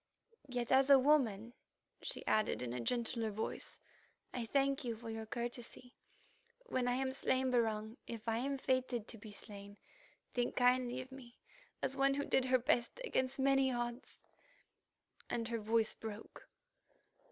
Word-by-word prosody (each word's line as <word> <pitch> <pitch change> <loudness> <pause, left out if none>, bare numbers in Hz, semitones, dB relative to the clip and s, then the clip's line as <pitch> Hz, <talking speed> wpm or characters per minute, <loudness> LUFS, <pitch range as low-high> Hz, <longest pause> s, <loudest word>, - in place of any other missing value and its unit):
Yet 245 -2 -2
as 265 +1 +5
a 275 - +10
woman," 245 -6 +3 0.5
she - - -4
added 215 -11 +2
in 120 -1 -3
a 125 - -3
gentler 230 - 0
voice, 215 +1 -3 0.5
"I 235 -2 -3
thank 275 +2 +2
you 235 -2 -2
for 225 0 -7
your 225 0 -5
courtesy. 240 +1 -6 0.7
When 255 - 0
I 245 - +2
am 265 0 0
slain, 260 -1 +1
Barung, 220 -1 0
if 230 -1 -7
I 225 0 +1
am 275 +2 -1
fated 255 -4 0
to 225 - -6
be 215 0 -10
slain, 205 0 -9 0.6
think 245 -1 0
kindly 250 0 +3
of 260 +1 -11
me, 250 -2 -12 0.5
as 270 - 0
one 275 0 +3
who 285 - -1
did 265 - +2
her 255 0 +4
best 240 - +1
against 260 - 0
mighty 270 0 +4
odds," 240 0 -4 1.1
and 230 -1 -1
her 230 -1 -1
voice 220 +1 +2
broke. 220 -1 -9
245 Hz, 155 wpm, -36 LUFS, 225-260 Hz, 1.1 s, a